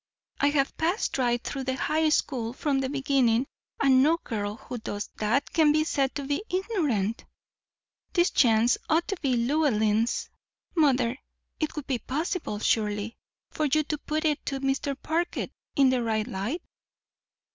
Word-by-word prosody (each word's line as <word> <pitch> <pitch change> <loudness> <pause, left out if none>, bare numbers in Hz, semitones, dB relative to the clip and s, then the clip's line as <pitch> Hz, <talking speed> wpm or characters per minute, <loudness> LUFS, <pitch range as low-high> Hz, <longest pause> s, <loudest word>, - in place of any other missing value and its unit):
I 285 - +4
have 280 -2 +1
passed 335 -2 0
right 240 -1 +1
through 270 -2 -4
the 260 0 -1
high 310 +3 +1
school 245 -6 0
from 275 0 0
the 265 -1 -1
beginning, 270 -4 +2 0.3
and 265 -2 +5
no 315 +5 +4
girl 210 -8 -4
who 250 0 -7
does 205 -2 -5
that 230 +7 0
can 315 -3 +5
be 310 +1 +3
said 275 -4 0
to 285 - -3
be 285 +7 -2
ignorant. 305 - -1 0.9
This 350 -2 +3
chance 230 -1 +4
ought 325 +2 +2
to 395 - -1
be 265 -5 +1
Llewellyn's. 235 -4 +1 0.4
Mother, 260 -5 +2 0.4
it 310 - -2
would 300 -3 -5
be 260 -3 -1
possible, 310 - -3
surely, 210 0 0 0.4
for 310 - -1
you 305 +2 +2
to 300 0 -3
put 310 +2 -2
it 300 -1 +1
to 275 -1 -2
Mr. 275 0 -1
Parker 340 +2 -1 0.3
in 270 -2 +5
the 255 -1 +1
right 220 -2 0
light?" 220 - -3
270 Hz, 160 wpm, -27 LUFS, 235-310 Hz, 0.9 s, and